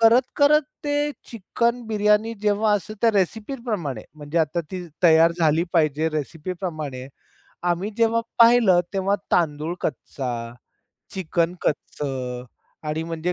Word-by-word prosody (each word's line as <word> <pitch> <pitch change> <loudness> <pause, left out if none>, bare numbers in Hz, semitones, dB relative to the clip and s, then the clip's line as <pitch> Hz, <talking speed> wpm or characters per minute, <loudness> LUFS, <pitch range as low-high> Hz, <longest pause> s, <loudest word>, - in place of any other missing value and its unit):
करत 230 +3 +6
करत 300 +1 +5 0.2
ते 290 0 0 0.2
चिकन 235 +3 -1
बिर्याणी, 210 +1 +2
जेव्हा 210 +1 +2
असं 205 +1 -4
त्या 230 - +5
रेसिपीप्रमाणे 210 - -2
म्हणजे 150 +2 -3
आता 160 +2 +1
ती 180 -2 -5 0.2
तयार 165 0 +6
झाली 160 0 +3
पाहिजे 155 -1 +2
रेसिपीप्रमाणे. 155 -3 -5 0.6
आम्ही 175 +4 0
जेव्हा 230 0 +3 0.2
पाहिलं, 230 -6 +6
तेव्हा 195 +1 +1 0.2
तांदूळ 160 0 +1
कच्चा, 135 -4 -4 0.9
चिकन 170 -1 0
कच्चं 130 -4 -3 0.4
आणि 155 +1 -1
म्हणजे. 165 +1 -2
180 Hz, 115 wpm, -23 LUFS, 155-220 Hz, 0.9 s, करत